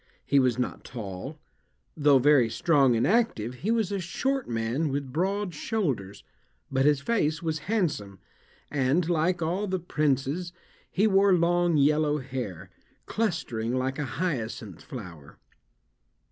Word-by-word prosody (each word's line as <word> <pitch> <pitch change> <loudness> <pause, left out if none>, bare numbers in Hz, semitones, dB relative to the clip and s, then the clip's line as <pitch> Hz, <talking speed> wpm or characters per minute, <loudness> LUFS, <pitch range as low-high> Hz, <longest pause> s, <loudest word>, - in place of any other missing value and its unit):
He 140 - +4
was 125 -3 +2
not 125 - -3
tall; 115 +4 -7 0.6
though 145 -2 +5
very 135 -3 +4
strong 135 0 +3
and 115 - +2
active, 195 - +1
he 205 - -2
was 225 -4 +1
a 200 - -1
short 265 +9 -2
man 115 +7 -1
with 135 -2 -3
broad 190 +3 -1
shoulders, 140 - -2 0.5
but 135 0 +2
his 145 -2 +3
face 160 -5 0
was 160 -1 -1
handsome, 150 - -1 0.5
and, 145 +4 +1
like 175 +1 +1
all 185 +6 -1
the 185 0 0
princes, 150 +1 -1 0.4
he 200 - +1
wore 195 -1 +4
long 175 -1 +3
yellow 150 +1 +3
hair, 120 - -6 0.3
clustering 130 - -2
like 130 +1 -1
a 145 - -1
hyacinth 115 - -3
flower. 85 - -10
150 Hz, 135 wpm, -27 LUFS, 125-180 Hz, 0.6 s, though